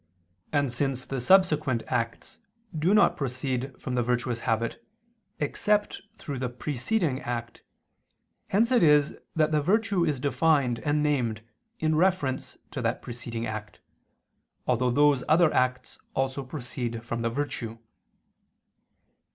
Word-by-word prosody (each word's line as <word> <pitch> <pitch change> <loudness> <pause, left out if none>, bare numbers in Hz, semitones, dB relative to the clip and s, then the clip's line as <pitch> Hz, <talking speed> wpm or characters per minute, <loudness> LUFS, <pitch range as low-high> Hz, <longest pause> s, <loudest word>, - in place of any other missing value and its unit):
And 145 -4 +1
since 130 0 -1
the 135 -2 -3
subsequent 150 -7 +3
acts 115 -2 -3 0.4
do 160 +4 +2
not 210 - +5
proceed 130 -1 -3
from 130 - -4
the 125 - +2
virtuous 120 0 0
habit 115 - -1 0.6
except 205 +8 0 0.2
through 140 -3 -5
the 125 -1 -1
preceding 140 - -1
act, 120 -1 -5 0.9
hence 225 +5 +2
it 245 -3 +4
is 150 -2 +4 0.2
that 155 -1 +2
the 150 -1 +2
virtue 200 +2 +2
is 150 -5 0
defined 140 -3 +2
and 150 0 0
named 120 -7 0 0.4
in 155 0 +1
reference 155 -6 +1
to - - -4
that - - -1
preceding 120 -1 -5
act, 110 -1 -6 0.9
although 125 0 +2
those 145 +1 +4
other 160 0 +5
acts 125 0 0 0.2
also 135 +1 -1
proceed 120 -4 -5
from 115 -1 -3
the 115 - 0
virtue. 115 -3 -3
135 Hz, 130 wpm, -27 LUFS, 120-155 Hz, 0.9 s, not